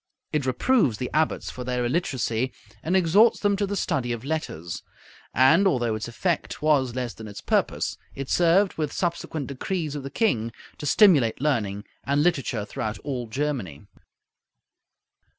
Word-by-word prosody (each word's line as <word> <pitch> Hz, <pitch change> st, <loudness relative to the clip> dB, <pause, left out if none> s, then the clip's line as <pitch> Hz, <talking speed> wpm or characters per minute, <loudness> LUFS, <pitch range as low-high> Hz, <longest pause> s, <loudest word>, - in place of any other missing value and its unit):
It 145 Hz, -3 st, 0 dB
reproves 130 Hz, -, +2 dB
the 125 Hz, -, -4 dB
abbots 155 Hz, +1 st, 0 dB
for 125 Hz, -, -7 dB
their 125 Hz, 0 st, -1 dB
illiteracy, 130 Hz, -4 st, 0 dB, 0.3 s
and 180 Hz, +4 st, +1 dB
exhorts 195 Hz, +6 st, +5 dB
them 205 Hz, -1 st, +2 dB
to 200 Hz, 0 st, 0 dB
the 200 Hz, -, -2 dB
study 130 Hz, -9 st, -1 dB
of 120 Hz, +1 st, -4 dB
letters; 110 Hz, -, -4 dB, 0.5 s
and 165 Hz, +10 st, +5 dB
although 120 Hz, -10 st, +1 dB
its 110 Hz, +1 st, -4 dB
effect 165 Hz, +8 st, -2 dB
was 140 Hz, -5 st, +2 dB
less 125 Hz, -2 st, -3 dB
than 110 Hz, -, -9 dB
its 100 Hz, -, -8 dB
purpose, -, -, 0 dB, 0.2 s
it 135 Hz, -1 st, -5 dB
served, 175 Hz, +4 st, +3 dB
with 150 Hz, -2 st, -1 dB
subsequent 170 Hz, -4 st, -2 dB
decrees 150 Hz, +3 st, -3 dB
of 145 Hz, -, -4 dB
the 135 Hz, -, -6 dB
king, 120 Hz, -, 0 dB, 0.3 s
to 150 Hz, -, -4 dB
stimulate 145 Hz, -, +5 dB
learning 110 Hz, -9 st, 0 dB, 0.2 s
and 140 Hz, +1 st, +1 dB
literature 135 Hz, -10 st, 0 dB
throughout 110 Hz, +1 st, -4 dB
all 130 Hz, -4 st, -3 dB
Germany. 120 Hz, -, -3 dB
135 Hz, 155 wpm, -25 LUFS, 120-165 Hz, 0.5 s, exhorts